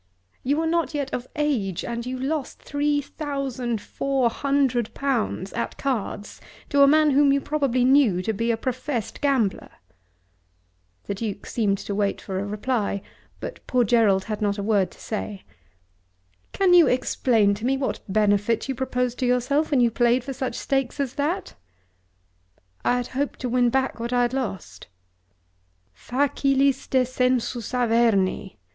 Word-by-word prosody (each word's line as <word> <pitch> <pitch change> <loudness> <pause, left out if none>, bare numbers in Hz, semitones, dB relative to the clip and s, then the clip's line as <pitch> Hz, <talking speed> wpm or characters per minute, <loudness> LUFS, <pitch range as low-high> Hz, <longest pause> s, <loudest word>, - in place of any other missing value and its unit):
You 280 +3 +1
were 325 - 0
not 330 -1 0
yet 280 -2 -3
of 245 +1 -3
age 255 - -1
and 235 +1 -4
you 255 0 -3
lost 275 +2 -3
three 290 0 0
thousand 270 -6 -3
four 265 +2 0
hundred 270 -4 0
pounds 240 -8 -1
at 235 - -3
cards 230 -6 -3 0.3
to 285 - +3
a 280 - +8
man 305 +1 +5
whom 280 +1 +5
you 280 - +3
probably 275 -4 0
knew 255 -9 +4
to 220 - -1
be 230 +3 -1
a 230 - +2
professed 255 -1 -3
gambler!" 260 -9 +1 1.3
The - - -3
Duke 205 0 -5
seemed 205 -4 0
to 200 - -5
wait 200 0 0
for 190 -2 -4
a 200 - -3
reply, 210 -1 -2 0.4
but - - -6
poor 250 -1 +3
Gerald 205 -4 +3
had 215 0 -5
not 205 -1 0
a 200 - -3
word 200 -4 +2
to - - -19
say. 210 -2 -5 1.1
"Can 380 -2 +3
you 345 -2 +7
explain 230 -4 +2
to 205 +2 -7
me 270 +1 +2
what 265 - -2
benefit 210 +3 +2
you 270 - -1
proposed 250 -1 -2
to 255 - +1
yourself 255 +5 +1
when 275 -4 +3
you 235 -1 +3
played 240 +1 +2
for 270 +1 -5
such 255 -2 -3
stakes 270 0 -1
as 270 -3 -1
that?" 315 +8 -2 1.3
"I 245 - +2
hoped 270 +4 -3
to 250 - -2
win 245 0 +3
back 265 0 0
what 235 +1 -3
I 245 0 +3
had 240 +1 0
lost." 190 - -5 1.1
"Facilis 275 - +1
descensus 250 -2 0
Averni!" 225 - +1
250 Hz, 160 wpm, -24 LUFS, 220-275 Hz, 1.3 s, a